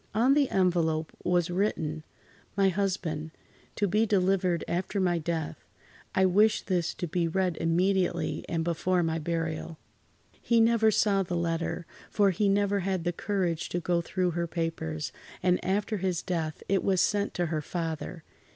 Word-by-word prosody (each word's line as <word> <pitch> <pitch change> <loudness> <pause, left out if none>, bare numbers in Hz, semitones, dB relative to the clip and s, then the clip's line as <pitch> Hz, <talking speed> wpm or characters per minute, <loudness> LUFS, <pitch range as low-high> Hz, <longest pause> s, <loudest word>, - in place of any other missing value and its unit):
On 245 +5 +4
the 285 -2 +3
envelope 165 -4 +1
was 175 -1 +1
written: 160 -5 -1 0.5
"My 195 -1 +4
Husband. 180 -5 -2 0.5
To 205 - +1
be 215 +4 +2
delivered 185 -3 +2
after 185 +3 -1
my 175 -2 +2
death. 160 -1 -3 0.5
I 190 - +4
wish 210 +4 +4
this 180 -3 -1
to 175 - -3
be 170 +1 0
read 180 0 0
immediately 180 +3 +1
and 165 -1 0
before 175 +2 +1
my 165 0 0
burial." 165 0 -3 0.6
He 235 -1 +3
never 225 -1 +4
saw 205 -2 +3
the 175 -2 -2
letter, 170 0 -2 0.2
for 200 -2 +3
he 200 +3 +1
never 200 0 +2
had 190 -2 -1
the 175 +1 -1
courage 180 -4 -1
to 175 - -1
go 175 0 +1
through 180 +1 -1
her 170 +1 -2
papers, 160 -2 -3 0.3
and 180 0 +2
after 205 +3 0
his 185 -2 -1
death 165 -4 -3
it 195 -1 +1
was 190 -2 +2
sent 205 +2 +1
to 175 - 0
her 155 - 0
father. 165 0 -4
180 Hz, 160 wpm, -28 LUFS, 165-195 Hz, 0.6 s, On